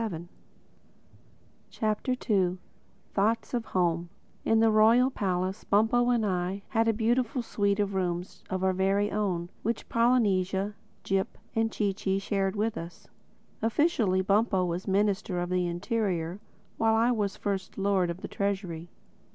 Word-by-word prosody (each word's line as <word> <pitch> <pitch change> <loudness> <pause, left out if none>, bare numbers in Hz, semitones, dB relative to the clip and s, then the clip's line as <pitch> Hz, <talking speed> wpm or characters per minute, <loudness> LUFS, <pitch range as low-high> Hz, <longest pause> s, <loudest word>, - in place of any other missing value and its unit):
THE 225 - 0
SECOND 170 -3 -7 1.4
CHAPTER 215 -4 0 0.6
THOUGHTS 220 +5 +1
OF 240 -2 -1
HOME 170 -2 0 0.3
IN 225 - +3
the 225 0 +5
Royal 230 +4 +5
Palace 185 -2 -2
Bumpo 225 +4 +3
and 235 -3 +2
I 185 +1 -1
had 225 0 +2
a - - +5
beautiful 240 +3 0
suite 200 -2 0
of 200 -1 0
rooms 180 -1 -3
of 185 0 -2
our 190 0 +3
very 195 +2 +1
own—which 200 +2 -2
Polynesia, 205 -5 +2 0.3
Jip 195 0 -1 0.2
and 225 0 +1
Chee 205 -2 0
Chee 190 0 -1
shared 195 0 -1
with 220 +2 -1
us. 170 +1 -10 0.5
Officially 225 - +2
Bumpo 195 -1 +2
was 175 +1 -3
Minister 200 -1 +1
of 175 0 -3
the 180 -1 +1
Interior; 180 -1 -2 0.4
while 225 0 +3
I 230 +2 +3
was 210 -4 -1
First 195 -2 -3
Lord 195 -3 +2
of 170 +2 -5
the - - -5
Treasury. 190 -4 -3
200 Hz, 145 wpm, -28 LUFS, 185-225 Hz, 1.4 s, the